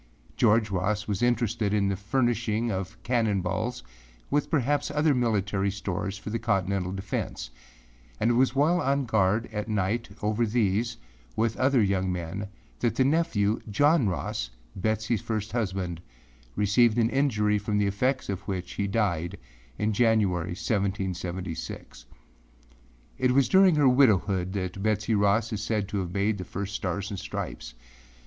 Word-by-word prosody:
George 110 0 +3
Ross 100 +3 -1
was 100 -3 -2
interested 115 -3 +1
in 100 -1 +2
the 100 - 0
furnishing 115 +1 0
of 95 -1 -4
cannon 110 -5 +1
balls, 95 - -3 0.5
with 145 +1 +1
perhaps 145 -1 +1
other 150 0 +2
military 105 -5 0
stores 100 0 -3
for 105 +1 -7
the 115 - -1
Colonial 95 -3 0
defence, 95 -10 -4 0.7
and 115 - +2
it - - +3
was 130 +2 +2
while 165 +6 +3
on 140 -1 +1
guard 110 0 +2
at 105 +1 -3
night 105 +3 -1
over 105 +3 +1
these, 115 0 0 0.4
with 115 0 +1
other 130 -2 +3
young 95 -2 +1
men, 90 +3 -4 0.3
that 120 - 0
the 130 - +3
nephew, 135 -9 +1
John 145 +2 +3
Ross, 70 -7 -3 0.3
Betseyâs 110 +3 -1
first 110 -2 -3
husband, 95 -7 -2 0.5
received 110 +3 +3
an 115 0 +2
injury 105 -7 +2
from 105 0 -1
the 105 - +2
effects 125 +7 0
of 100 -1 -3
which 95 -3 -3
he 100 - -1
died 95 -6 -1 0.4
in 110 +1 0
January, 100 -6 +2
1776. 95 - -3 1.1
It 130 - +3
was 135 0 +4
during 190 -3 +5
her 145 -2 +4
widowhood 100 -8 +3
that 95 -1 -3
Betsey 110 +1 0
Ross 105 +2 +2
is 105 - -3
said 105 -2 -1
to 105 - -2
have 90 -2 -3
made 100 +2 0
the - - -3
first 100 +2 -5
Stars 100 0 -3
and 100 - -4
Stripes. - - -6
105 Hz, 155 wpm, -27 LUFS, 95-120 Hz, 1.1 s, during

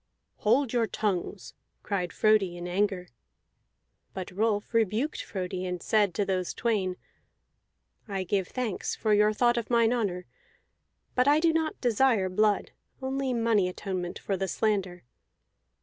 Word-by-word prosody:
"Hold 245 +4 +2
your 235 -2 +2
tongues!" 195 -1 -3 0.3
cried 180 -4 -2
Frodi 205 -5 +2
in 175 0 -6
anger. 185 -1 -1 1.1
But 190 -1 -5
Rolf 205 +3 -1
rebuked 230 +6 +1
Frodi, 185 -1 -4
and 180 -1 -3
said 210 -4 +2
to 205 - +1
those 185 -2 -2
twain: 195 -6 0 1.1
"I 195 -2 -2
give 190 0 0
thanks 245 -7 -3
for 215 -1 +1
your 210 +1 +4
thought 240 +2 +2
of 235 - -3
mine 235 -1 +3
honor. 190 -7 -2 0.9
But 250 +1 +2
I 295 +2 +5
do 325 0 +3
not 320 -1 -1
desire 235 -5 +3
blood, 210 +2 +1 0.3
only 265 0 -2
money 230 -6 +2
atonement 180 -1 -4
for 195 - -2
the 190 +1 -2
slander. 190 -3 -1
210 Hz, 140 wpm, -28 LUFS, 185-235 Hz, 1.1 s, I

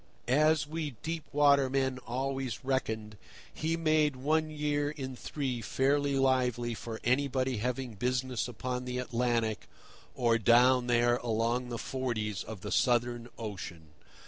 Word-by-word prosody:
As 150 +4 +4
we 150 -3 -4
deep 160 -1 -3
water 140 -2 +4
men 130 -1 0
always 130 -1 -3
reckoned, 110 -5 -2 0.4
he 165 +1 -1
made 155 -3 +2
one 155 +4 +1
year 145 -1 -1
in 135 -3 -6
three 130 -2 -3
fairly 140 +4 +1
lively 125 -3 +1
for 115 0 -6
anybody 130 0 +1
having 125 +2 -2
business 125 +2 -1
upon 125 +2 -4
the 125 0 -3
Atlantic 120 -3 -1 0.5
or 115 -1 +2
down 125 +3 +5
there 120 0 +3
along 120 +1 -1
the 120 - -3
"forties" 110 -7 -2
of 110 -4 -8
the - - -5
Southern 120 -1 +1
Ocean. 90 -7 -7
125 Hz, 135 wpm, -31 LUFS, 120-140 Hz, 0.5 s, down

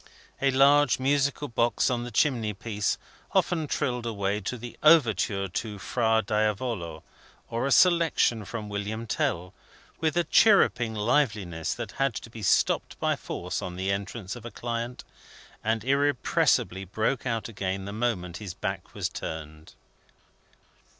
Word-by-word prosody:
A 140 - +4
large 140 +1 +5
musical 140 +2 +1
box 120 0 +1
on 120 -1 -1
the 120 - -5
chimney 115 -6 +1
piece 105 0 -1 0.4
often 160 -4 +1
trilled 125 -4 -1
away 100 -2 -1
at 105 - -8
the 120 -1 -5
Overture 110 -10 +4
to 105 +3 -4
Fra 110 +1 +1
Diavolo, 105 -5 -1 0.5
or 115 +3 -1
a - - -1
Selection 165 - +4
from 105 +1 -6
William 105 +2 -4
Tell, 90 -4 -1 0.5
with 160 +1 0
a 175 - +4
chirruping 125 - +4
liveliness 105 - 0
that - - -6
had 135 -4 +2
to 115 - -7
be 115 - -9
stopped 100 - +1
by - - +1
force - - -4
on 90 -1 -5
the 95 +2 -1
entrance 100 +1 -4
of 120 - -10
a 120 - -6
client, 120 +1 -4 0.6
and 110 0 0
irrepressibly 135 -8 +2
broke 110 +7 -1
out 115 -3 -1
again 95 -3 -3
the 100 - -6
moment 105 -6 -2
his 100 -4 -7
back 95 -2 -5
was - - -1
turned. 80 0 -7
115 Hz, 145 wpm, -27 LUFS, 100-130 Hz, 0.6 s, large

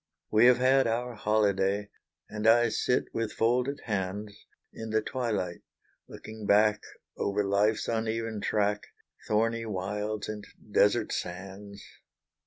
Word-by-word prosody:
We 110 +3 +6
have 125 - +6
had 130 +1 +4
our 120 +2 -1
holyday, 105 -2 +1 0.4
And 105 +1 -3
I 120 +1 +6
sit 125 +3 0
with 115 -2 -2
folded 125 +5 0
hands, 100 0 -3 0.4
In 110 0 -7
the 110 0 +2
twilight 105 -10 -2 0.5
looking 110 -1 -9
back 105 0 +4 0.4
Over 100 +1 0
life's 100 +2 +1
uneven 115 -1 -2
track 105 0 0 0.4
Thorny 115 +1 +1
wilds, 105 +2 -3
and 105 -1 -5 0.3
desert 100 0 +3
sands. 95 +3 -6
105 Hz, 120 wpm, -29 LUFS, 100-115 Hz, 0.5 s, We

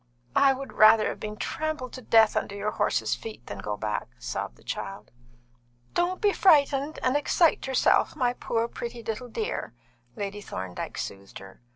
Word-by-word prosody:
"I 275 -1 +6
would 270 +1 -7
rather 215 0 +6
have - - -6
been 210 0 -6
trampled 310 -3 -3
to 255 - -7
death 225 -2 +5
under 200 - -2
your 205 +1 -2
horses' 115 -3 0
feet 215 - -7
than 100 - -7
go 105 +1 -3
back!" 105 -1 -2
sobbed - - -4
the - - -22
child. - - -6 0.8
"Don't 355 +1 0
be 410 -2 +3
frightened 290 -4 +4
and 255 +2 +2
excite 295 +1 +2
yourself, 265 -1 +3
my 245 -4 +1
poor, 230 -2 -1
pretty 235 0 -7
little 225 +3 -4
dear," 220 - -4 0.4
Lady 205 0 -4
Thorndyke 95 - -6
soothed 100 0 -6
her. 95 +2 -13
225 Hz, 170 wpm, -27 LUFS, 200-275 Hz, 0.8 s, I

